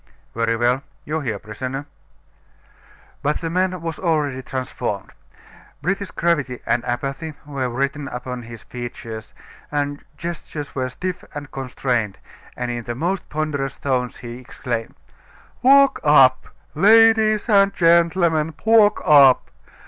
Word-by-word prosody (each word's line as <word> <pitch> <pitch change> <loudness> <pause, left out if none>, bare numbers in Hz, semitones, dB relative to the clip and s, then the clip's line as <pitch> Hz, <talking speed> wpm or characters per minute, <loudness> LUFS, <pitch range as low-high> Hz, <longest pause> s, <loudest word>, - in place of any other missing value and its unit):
"Very 115 0 0
well. 120 +3 +1 0.2
You 155 +2 -2
hear, 115 -8 -3
prisoner?" 130 +7 -6 1.4
But 150 +2 0
the 165 -1 -4
man 185 +1 0
was 165 -2 -4
already 150 -7 0
transformed. 125 -6 -4 0.7
British 195 +3 -1
gravity 145 -7 0
and 120 - +1
apathy 135 +5 -3
were 135 -3 -3
written 140 +3 -2
upon 125 0 -5
his 115 -1 -11
features; 115 -2 -8 0.3
his 145 -1 -1 0.2
gestures 160 -3 -6
were 130 -1 -2
stiff 180 +7 -5
and 145 -1 -7
constrained, 125 -5 -2 0.4
and 125 0 -2
in 120 -1 -5
the 120 - -4
most 175 +8 -2
ponderous 150 -3 -2
tones 125 -3 -1
he 120 0 -8
exclaimed: 120 -2 -5 0.7
"Walk 275 +2 +6
up! 135 -3 +5 0.3
ladies 220 +3 +5
and 200 -3 +5
gentlemen, 165 -2 +3
walk 220 -2 +5
up! 140 -4 +6
140 Hz, 125 wpm, -21 LUFS, 125-170 Hz, 1.4 s, Walk